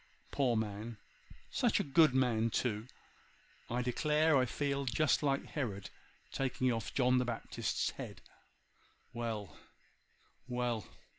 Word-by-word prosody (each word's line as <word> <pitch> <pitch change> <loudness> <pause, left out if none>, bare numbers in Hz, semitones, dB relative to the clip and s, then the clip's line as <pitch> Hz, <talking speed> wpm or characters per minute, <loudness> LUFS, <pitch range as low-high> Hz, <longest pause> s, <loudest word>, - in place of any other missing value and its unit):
Poor 125 -5 +2
man! 110 +1 -3 0.5
such - - +2
a - - +1
good 155 +1 +5
man 115 -3 +3
too! 110 -1 -1 0.8
I 125 +1 0
declare 150 +5 +3
I 130 -2 +4
feel 140 +2 -1
just 140 +5 +2
like 140 -2 +1
Herod 105 -10 -4 0.4
taking 130 -1 0
off 115 - -3
John 125 -1 +3
the 125 - +1
Baptist's 120 -2 -2
head. - - -8 0.9
Well! 115 -4 -4 0.9
well! 120 -5 -1
125 Hz, 120 wpm, -34 LUFS, 115-140 Hz, 0.9 s, good